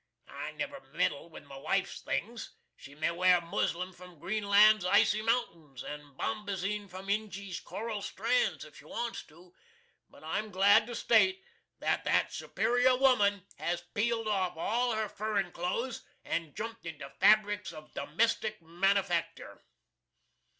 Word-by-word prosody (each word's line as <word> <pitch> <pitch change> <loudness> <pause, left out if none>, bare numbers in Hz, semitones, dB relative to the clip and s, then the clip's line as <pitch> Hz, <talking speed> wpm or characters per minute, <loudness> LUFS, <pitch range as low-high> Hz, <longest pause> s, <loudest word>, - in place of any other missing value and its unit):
I - - -6
never - - -5 0.2
meddle 145 +4 0
with 160 - -11
my 140 -1 -11
wife's 195 +7 -1
things. 230 +2 -4 0.2
She 140 -2 -13
may 155 +3 0
wear 180 +1 +4
muslin 175 +2 -2
from 180 -1 -14
Greenland's 210 +3 +4
icy 210 +3 +4
mountains, 170 - -2
and 145 -2 -9
bombazeen 205 -1 -3
from 185 +2 -9
Injy's 200 -2 -3
coral 220 -2 -5
strands, - - 0
if - - -15
she - - -16
wants 235 -1 -4
to; 175 +3 -18 0.6
but - - -17
I'm 215 0 -2
glad 205 +3 +5
to 240 - -5
state 375 +15 +3 0.3
that - - 0
that - - +2
superior 250 +1 +2
woman 205 -8 +3
has 175 0 -2
peeled 225 +1 0
off 190 -5 0
all 240 +7 0
her 220 0 -1
furrin 205 -3 -2
clothes 230 +9 -3 0.2
and 165 -4 -3
jumpt 225 -4 -6
into 150 -4 -7
fabrics 205 0 +4
of 155 -2 -12
domestic 215 +8 0
manufactur. 175 0 -1
200 Hz, 140 wpm, -31 LUFS, 175-220 Hz, 0.6 s, glad